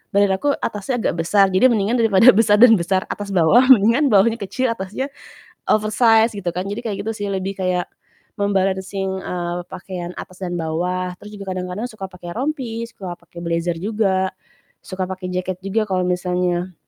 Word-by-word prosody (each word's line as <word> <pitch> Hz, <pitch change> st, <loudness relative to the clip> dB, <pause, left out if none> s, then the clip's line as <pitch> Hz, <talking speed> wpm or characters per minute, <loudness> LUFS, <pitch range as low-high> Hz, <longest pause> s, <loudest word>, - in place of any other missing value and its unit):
badan 200 Hz, -1 st, +4 dB
aku 285 Hz, -1 st, +1 dB
atasnya 210 Hz, +4 st, -2 dB
agak -, -, +1 dB
besar, 200 Hz, +3 st, +5 dB
jadi 190 Hz, +8 st, +5 dB
mendingan 215 Hz, +3 st, +1 dB
daripada 225 Hz, +1 st, +6 dB
besar 210 Hz, 0 st, +4 dB
dan 245 Hz, -2 st, +9 dB
besar, 185 Hz, +2 st, 0 dB
atas 205 Hz, -1 st, -5 dB
bawah 185 Hz, +9 st, +5 dB
mendingan 235 Hz, +6 st, +5 dB
bawahnya 225 Hz, +4 st, +5 dB
kecil 255 Hz, +6 st, -1 dB
atasnya 215 Hz, +6 st, -4 dB, 0.6 s
oversized 220 Hz, +1 st, +3 dB
gitu 180 Hz, -3 st, -2 dB
kan 180 Hz, +2 st, -3 dB
jadi 205 Hz, +3 st, -4 dB
kayak 205 Hz, -3 st, -2 dB
gitu 225 Hz, -, -1 dB
sih 205 Hz, -1 st, -4 dB
lebih 190 Hz, 0 st, -2 dB
kayak 180 Hz, -1 st, 0 dB, 0.5 s
mem-balancing, 190 Hz, -1 st, -1 dB
eee, 175 Hz, -1 st, -3 dB
pakaian 180 Hz, -1 st, -7 dB
atas 185 Hz, +1 st, -10 dB
dan 175 Hz, -1 st, -3 dB
bawah. 180 Hz, +3 st, -2 dB
Terus 210 Hz, 0 st, -10 dB
juga 195 Hz, -2 st, -5 dB
kadang-kadang 185 Hz, +5 st, -4 dB
suka 215 Hz, -5 st, -7 dB
pakai 175 Hz, -2 st, -9 dB
rompi, 245 Hz, -4 st, -3 dB
suka 185 Hz, -5 st, -7 dB
pakai 170 Hz, -, -14 dB
blazer 170 Hz, 0 st, -1 dB
juga, 190 Hz, -1 st, 0 dB, 0.5 s
suka 185 Hz, -1 st, -4 dB
pakai 185 Hz, 0 st, -6 dB
jaket 185 Hz, 0 st, -3 dB
juga 210 Hz, +3 st, -1 dB
kalau 185 Hz, -2 st, -1 dB
misalnya 180 Hz, 0 st, -1 dB
195 Hz, 170 wpm, -20 LUFS, 180-215 Hz, 0.6 s, dan